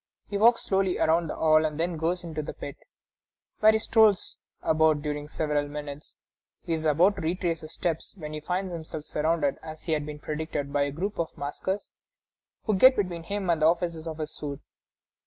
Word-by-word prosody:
He 205 - -4
walks 230 +3 +5
slowly 190 -1 +1
around 165 +1 +3
the - - -4
hall, 155 0 +4
and 155 -1 -2
then 170 +1 0
goes 170 +3 -1
into 160 -2 -4
the 150 - -7
pit, 140 - -7 0.8
where 215 0 +7
he 220 - +3
strolls 220 -3 +3 0.2
about 155 -2 +3
during 150 -1 -3
several 150 -1 -1
minutes. 145 0 -7 0.5
He 170 - -1
is 160 -1 -2
about 170 +7 +4
to - - -4
retrace 170 0 -1
his 155 - -8
steps, 165 +1 -2
when 155 -3 -7
he 155 - -3
finds 180 +3 -2
himself 160 -2 -6
surrounded, 150 -2 0
as 155 -1 -9
had 155 -3 0
been 150 0 -6
predicted, 150 -1 -4
by 145 0 +3
a 140 - -3
group 190 +8 -3
of 165 - -3
maskers 190 +8 -3 0.7
who 215 - +1
get 260 +7 +7
between 180 -4 -1
him 200 +3 -3
and 165 -2 0
the 155 - +6
officers 170 -1 0
of 160 -1 -5
his 155 -1 -5
suite. 145 -2 -6
160 Hz, 195 wpm, -27 LUFS, 150-180 Hz, 0.8 s, where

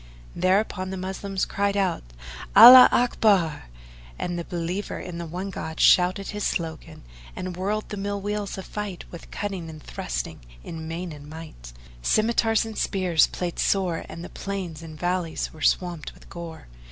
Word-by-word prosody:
Thereupon 185 0 +1
the 190 - -4
Moslems 190 +1 -3
cried 200 0 -1
out, 190 -4 0 0.5
"Allaho 250 +4 +12
Akbar!" 200 -10 +2 0.5
and 175 -1 -3
the - - -3
believer 175 +4 -4
in 170 -2 -7
the 170 - -5
One 185 +4 -5
God 160 -3 -6
shouted 185 +2 +4
his 210 -1 -4
slogan, 165 - -4 0.3
and 185 -1 -5
whirled 205 +4 -2
the 205 - -5
mill 200 +1 -3
wheels 205 0 -3
of 190 - -6
fight 210 -4 -6
with 170 - -10
cutting 190 -5 -4
and 155 -1 -9
thrusting - - -5 0.2
in 160 -1 -7
main 170 +2 -5
and 145 0 -11
might; 155 - -10 0.3
scymitars 225 - +2
and 220 -1 -6
spears 180 -5 +2
played 175 -1 -4
sore 185 -4 +1
and 170 - -8
the - - -8
plains 185 -5 -5
and 155 -2 -10
valleys 175 -1 -2
were 155 - -13
swamped 175 0 0
with - - -18
gore. 170 -2 -8
185 Hz, 165 wpm, -25 LUFS, 165-200 Hz, 0.5 s, Allaho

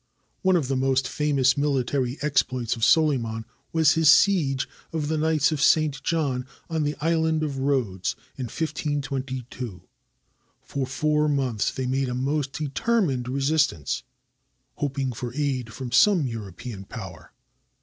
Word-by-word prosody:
One 190 -1 +3
of 155 -7 +1
the 135 - 0
most 130 0 +1
famous 140 -3 +2
military 135 -2 0
exploits 130 -5 +1
of 115 - -6
Solyman 120 -9 +3 0.3
was 160 -2 +4
his 160 -2 +4
siege 155 -9 +4 0.2
of 155 -2 -2
the 160 - 0
Knights 155 -1 +2
of 150 -3 -2
St. 150 -3 +3
John 140 -7 -1 0.2
on 160 -1 0
the 150 0 -1
island 160 0 +1
of 140 -3 -3
Rhodes, 125 -10 0 0.2
in 130 - -4
1522, 130 - -4 0.8
For 135 -2 -3
four 150 +2 +1
months 130 -7 0
they 130 - -3
made 130 +1 0
a 125 - -2
most 135 +1 -1
determined 150 - 0
resistance, 140 - +1 0.8
hop 140 -1 -2
ing 135 -2 -1
for 120 +1 -6
aid 135 -6 -1
from 125 +1 -6
some 190 -3 +5
European 110 -2 -6
power. 95 -6 -9
135 Hz, 140 wpm, -25 LUFS, 125-150 Hz, 0.8 s, some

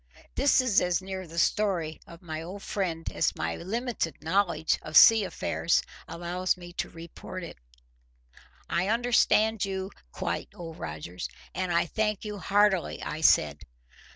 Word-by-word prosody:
This 275 -1 +4
is 255 -6 +3
as 180 -1 +1
near 190 -1 -6
the 165 +1 -11
story 170 -4 +1
of 170 +1 -13
my 160 -2 -5
old 185 +5 -8
friend 170 -5 -3
as - - 0
my 85 +1 -2
limited 225 - -3
knowledge 165 -2 +1
of 155 0 +1
sea 225 -2 +9
affairs 170 -2 0 0.2
allows 180 +2 -1
me 175 -1 -11
to - - -3
report 170 +2 -9
it. 170 - -9 1.1
"I 175 +2 0
understand 225 -1 +3
you 190 -1 -3 0.2
quite, - - -3
Old 165 -2 -9
Rogers, 80 +3 -6 0.2
and 185 -1 -2
I 170 0 +3
thank 215 +3 -1
you 210 -1 -5
heartily," 200 -2 +2
I 155 - -4
said. 75 - +4
180 Hz, 150 wpm, -28 LUFS, 165-205 Hz, 1.1 s, sea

